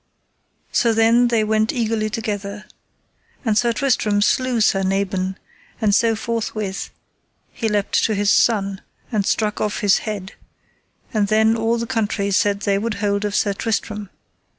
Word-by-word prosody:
So 230 -1 +2
then 230 +2 +4
they 230 -2 +2
went 215 +1 +1
eagerly 225 -2 -1
together, 210 -1 -4 0.8
and 220 -2 +2
Sir 235 +2 +3
Tristram 220 -5 +1
slew 255 +1 +1
Sir 195 -2 +3
Nabon, 190 0 -1 0.4
and 215 -3 +2
so 225 +2 +3
forthwith 215 -3 -3 0.6
he 225 - -2
leapt 205 -1 +1
to 220 - 0
his 205 0 +2
son, 200 -4 +2 0.3
and 210 -4 0
struck 210 -1 0
off 210 -1 -1
his 205 -2 +4
head; 205 -3 -5 0.8
and 210 -2 +1
then 220 +1 +3
all 225 +1 0
the 230 - -2
country 215 -4 -1
said 200 +1 +1
they 200 -2 +1
would 220 0 -2
hold 200 0 -1
of 205 0 -2
Sir 205 -1 +1
Tristram. 210 -1 -3
215 Hz, 150 wpm, -21 LUFS, 200-225 Hz, 0.8 s, then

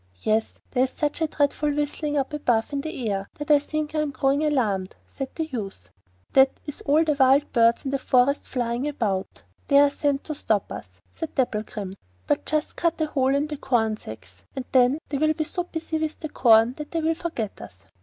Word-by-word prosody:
'Yes; 220 - 0 0.2
there 255 0 +3
is - - -5
such 300 +3 -2
a 320 - +3
dreadful 295 0 0
whistling 295 0 -1
up 275 +2 -1
above 245 -4 0
in 280 - -1
the 275 -6 -4
air 195 0 -3
that 295 0 -3
I 295 - +7
think 305 +1 -3
I 310 - 0
am 305 -1 0
growing 275 +1 +1
alarmed,' 215 -11 0
said 270 -1 -6
the 320 - -1
youth. 195 - -6 0.4
'That 265 0 +5
is 295 -2 -6
all 300 +3 +5
the 310 -2 +2
wild 275 +1 +4
birds 230 +1 +4
in 270 - -1
the 275 - 0
forest 260 +3 +2
flying 245 +1 -2
about; 210 -10 -2 0.2
they 280 - +5
are 285 0 +6
sent 285 -1 0
to 310 - -4
stop 215 -8 -1
us,' 90 -2 -9
said 325 - -6
Dapplegrim. 215 -5 -2 0.3
'But - - 0
just 305 0 -1
cut 335 -1 0
a 315 - +2
hole 270 -3 +1
in 285 +1 +1
the 300 -1 -5
corn 225 -5 +1
sacks, 95 - -11
and 265 - -4
then 255 +2 +4
they 280 - -2
will 310 +1 +3
be 310 - 0
so 350 +3 -3
busy 320 -2 -4
with 315 -1 -3
the 310 - -5
corn 230 -2 +5
that 300 -1 -6
they 330 - -1
will 320 +1 +2
forget 315 -11 -4
us. 95 -2 -12
275 Hz, 215 wpm, -25 LUFS, 230-300 Hz, 0.4 s, I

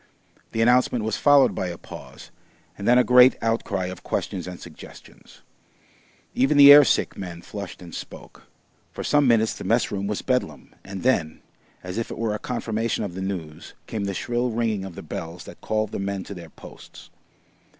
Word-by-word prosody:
The 115 - +1
announcement 125 -1 +3
was 110 0 -1
followed 145 -2 +5
by 95 - -3
a 85 -1 -6
pause, - - -12 0.4
and 100 - -6
then 120 +1 +6
a 125 - +5
great 125 +1 +6
outcry 115 -4 -1
of 90 0 -7
questions 90 -3 -4
and 90 -1 -8
suggestions. 85 -3 -14 0.9
Even 135 +3 +2
the 140 0 +10
air 145 0 +9
sick 130 - 0
men 90 -3 -8
flushed 100 -3 -8
and 85 -2 -12
spoke. - - -10 0.4
For - - -7
some 145 -2 +3
minutes 110 -2 +3
the - - -9
mess 115 +6 +1
room 100 -1 -3
was 105 -1 -3
Bedlam, 125 -1 -2
and 95 -1 -8
then, 85 -12 0 0.4
as 90 +4 -4
if 115 - -4
it - - -7
were 115 -2 -1
a 105 - -4
confirmation 115 -2 -2
of 100 -4 -5
the 95 - -6
news, 85 -5 -6
came 105 -2 -4
the 100 -1 -3
shrill 120 +4 -1
ringing 110 -4 -1
of 95 -3 -9
the - - -9
bells 85 +2 -7
that - - -13
called 110 -1 -1
the - - -4
men 100 -1 -3
to - - -8
their 85 -3 -10
posts. - - -14
105 Hz, 190 wpm, -24 LUFS, 95-120 Hz, 0.9 s, the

